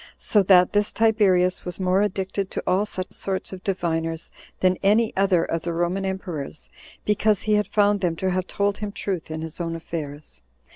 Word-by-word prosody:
So 210 - +3
that 180 -2 +5
this 205 0 +2
Tiberius 200 -5 +3
was 180 +1 -5
more 185 +1 +2
addicted 195 -1 -2
to - - -4
all 195 +3 +2
such 185 -2 -5
sorts 190 0 -3
of 185 0 -9
diviners 165 -3 -2 0.3
than 185 0 +2
any 215 +3 +3
other 190 -3 +3
of 165 - -2
the 170 +1 -3
Roman 175 +3 -1
emperors, 175 -6 -5 0.3
because 210 -1 +2
he 215 - +1
had 210 0 +2
found 205 -1 +2
them 175 -3 0
to 185 +3 -1
have 185 0 -1
told 200 0 -1
him 210 -1 -4
truth 190 -5 -4
in 160 0 -4
his 160 +2 -4
own 165 -1 -2
affairs. 150 - -7
185 Hz, 190 wpm, -24 LUFS, 170-200 Hz, 0.3 s, that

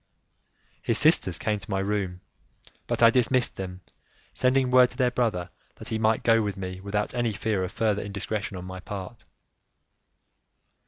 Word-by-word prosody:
His - - +1
sisters - - +4
came 105 -1 -1
to 100 - -13
my 95 - 0
room, 95 -2 -2 0.7
but - - 0
I 115 - +8
dismissed 125 +1 +2
them, 90 -1 -6 0.5
sending 130 0 +2
word 125 -1 +6
to - - -14
their 125 -2 +2
brother 100 -8 -1 0.2
that - - -9
he 110 - -2
might 110 0 +2
go 115 -1 +4
with 100 -2 -3
me, 95 -1 -6
without 105 +1 -2
any 120 -2 0
fear 100 -2 -1
of 90 - -4
further 105 -1 0
indiscretion 100 0 -4
on 90 - -7
my 95 0 -7
part. 100 +4 -8
105 Hz, 165 wpm, -26 LUFS, 95-115 Hz, 0.7 s, I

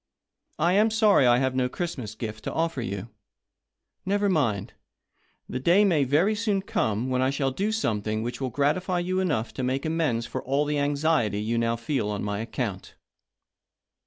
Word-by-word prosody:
I 170 +3 +2
am 210 +3 +4
sorry 215 - +4
I 120 0 +5
have 130 0 +1
no 130 -1 0
Christmas 125 - -5
gift 110 -1 -6
to - - -2
offer 165 -5 -1
you. 100 -2 -5 0.9
Never 200 +1 +1
mind 120 - 0 0.4
— - - -42
the - - -4
day 175 +9 +4
may 160 -8 +3
very 160 +11 +3
soon 205 -3 0
come 130 - -1
when 130 0 +1
I 130 - +2
shall 135 -1 0
do 200 +10 -1
something 110 - -1
which 120 +3 -5
will 130 - -1
gratif 145 +8 0
y 180 -2 +1
you 185 +2 -1
enough 145 -12 -1
to - - -4
make 130 +3 -1
amends 155 -8 0
for - - -4
all 140 +3 +1
the 150 0 0
anxiety 145 -7 +1
you 115 +2 -1
now 115 0 +1
feel 115 -1 -2
on 105 -1 -3
my 105 0 -2
account." 110 -4 -4
135 Hz, 190 wpm, -26 LUFS, 115-175 Hz, 0.9 s, I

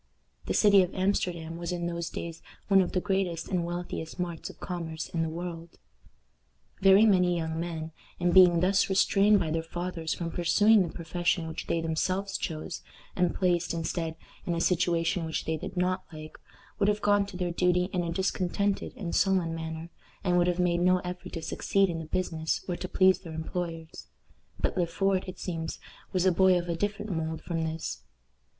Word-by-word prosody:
The - - 0
city 200 -2 +6
of 180 0 -2
Amsterdam 180 -4 -1
was 170 0 -4
in 175 -1 -2
those 170 0 -3
days 165 -1 -6 0.3
one 195 -1 +6
of 180 - -2
the 185 - +2
greatest 185 -4 -1
and 180 -3 0
wealthiest 175 -1 -5
marts 175 -2 -4
of - - -13
commerce 165 -3 -5
in 165 - -1
the 160 - 0
world. 170 0 -7 1.0
Very 195 +2 +7
many 180 -4 +4
young 160 -1 -2
men, 165 -2 -4 0.3
in 175 0 +2
being 175 -2 +7
thus 195 +2 +3
restrained 200 +2 +4
by 160 -4 -1
their 165 +1 0
fathers 170 0 -4
from 170 -1 -4
pursuing 205 +5 +4
the 170 -3 -1
profession 170 0 -1
which 160 0 -6
they 165 - 0
themselves 185 +5 -1
chose, 160 +1 -4 0.3
and 180 -1 +1
placed, 175 -2 +1
instead, 165 0 -2 0.3
in 175 - 0
a - - -1
situation 170 0 +1
which 160 0 -3
they 160 - 0
did 185 +3 -7
not 185 +1 0
like, 155 -1 -9 0.4
would 200 - +3
have 210 0 -1
gone 205 -1 +3
to 195 -3 -8
their 180 -1 -1
duty 180 +1 +2
in 180 - +1
a 170 -1 -2
discontented 190 +2 -1
and 175 -5 -4
sullen 180 -2 +2
manner, 160 +1 -6 0.3
and 180 -2 +2
would 175 0 +3
have 175 -1 +1
made 175 -1 +2
no 185 +1 +4
effort 180 +1 -7
to 165 - -5
succeed 195 +2 +1
in 165 - -4
the 160 - -6
business 160 -1 -2
or 180 - -1
to 185 - -6
please 185 0 +4
their 170 -4 -9
employers; 165 0 -5 0.5
but - - 0
Le 175 -2 +1
Fort, 195 +2 0
it 185 - -7
seems, 165 -3 -4 0.3
was 185 -1 +1
a 185 - +5
boy 185 +1 +5
of 175 0 -3
a 170 - -1
different 205 +3 -2
mould 160 -1 -3
from 165 -2 -2
this. 160 - -4
175 Hz, 195 wpm, -28 LUFS, 165-185 Hz, 1.0 s, Very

